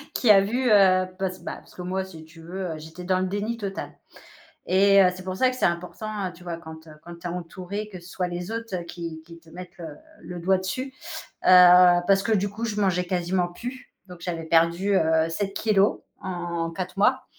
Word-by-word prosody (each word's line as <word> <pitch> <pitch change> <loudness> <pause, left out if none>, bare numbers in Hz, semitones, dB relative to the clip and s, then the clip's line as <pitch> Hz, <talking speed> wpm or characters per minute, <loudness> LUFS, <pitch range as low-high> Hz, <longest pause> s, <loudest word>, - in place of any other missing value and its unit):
qui 240 - +5
a 195 -2 +7
vu, 240 +4 0
heu, 185 -2 +5
parce 185 -1 -3
bah, - - -5
c - - -8
parce - - -20
que, - - -8
moi, 190 +1 -2
si 160 -4 -12
tu 160 +1 -16
veux, 180 +1 -5
heu, - - -7
j'étais 160 +3 -10
dans 185 0 +1
le 185 - 0
déni 205 +4 -3
total 200 -3 -5 0.7
et 195 +1 +5
heu, 180 - +5
c'est 185 - -9
pour 185 0 -4
ça 255 - +4
que 255 - -5
c'est - - 0
important, 190 +4 -3
heu, 180 - -8
tu 175 - -16
vois, 170 -2 -5
quand, 160 -1 -11
heu, 155 - -12
quand 175 0 -10
tu 175 - -6
es - - -3
entourée, 180 +4 -6
que 185 -3 -9
ce 175 - -13
soit 180 0 -2
les 175 +3 -5
autres 225 -3 -4
qui 165 -2 -7
qui 170 -1 -13
te 165 - -20
mettent, 180 +1 -11
heu, 165 - -6 0.3
le 175 -1 -7
doigt 190 +3 +2
dessus. 255 +9 -4 0.5
Heu 180 -1 +8
parce 195 0 +4
que, 225 - 0
du 205 -1 +2
coup, 220 +3 -5
je 210 -2 -2
mangeais 180 -2 +1
quasiment 180 0 0
plus, 245 +9 -8 0.2
donc 180 -1 -11
j'avais 165 -2 -4
perdu, 170 +5 +2
heu, 160 -1 +2
7 195 +3 -3
kilogrammes 210 -2 +2 0.2
en 175 -3 -3
4 180 +2 -6
mois. 255 +5 +3
185 Hz, 230 wpm, -25 LUFS, 175-200 Hz, 0.7 s, Heu